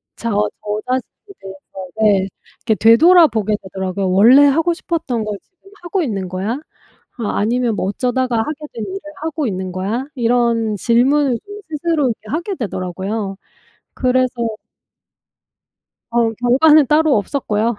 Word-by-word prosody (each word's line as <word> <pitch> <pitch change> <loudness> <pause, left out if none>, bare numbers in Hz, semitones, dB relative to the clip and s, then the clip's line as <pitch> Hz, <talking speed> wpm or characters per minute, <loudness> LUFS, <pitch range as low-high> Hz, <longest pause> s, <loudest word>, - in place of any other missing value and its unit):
저 230 - -4 0.3
저 210 0 -3
자신에 260 +10 -4
대해서 190 -1 -10
네 200 -3 +3 0.4
이게 220 -2 +1
되돌아보게 230 - +5
되더라고요. 190 0 -3
'원래 230 +9 +6
하고 325 +5 +2
싶었던 310 -10 -3
걸 210 -1 -4
지금 390 +1 -24
하고 360 +2 -1
있는 200 - -3
거야? 190 +5 -3 0.7
아 220 - -2
아니면 235 +2 0
뭐 190 - -2
어쩌다가 250 +2 -1
하게 300 +7 -2
된 230 - -5
일을 385 +1 -5 0.2
하고 315 -4 -2
있는 185 -2 -4
거야?' 205 +8 -3
이런 235 -3 +1
질문을 250 +4 +2
좀 410 +1 -9
스스로 315 0 -1
이렇게 220 -2 -5
하게 345 - -3
되더라고요. 195 - -4 0.6
그래서 255 -1 +1 1.8
어 235 -1 +2
결과는 275 +6 +4
따로 305 -3 +3
없었고요. 220 0 -1
235 Hz, 300 characters per minute, -18 LUFS, 205-285 Hz, 1.8 s, 원래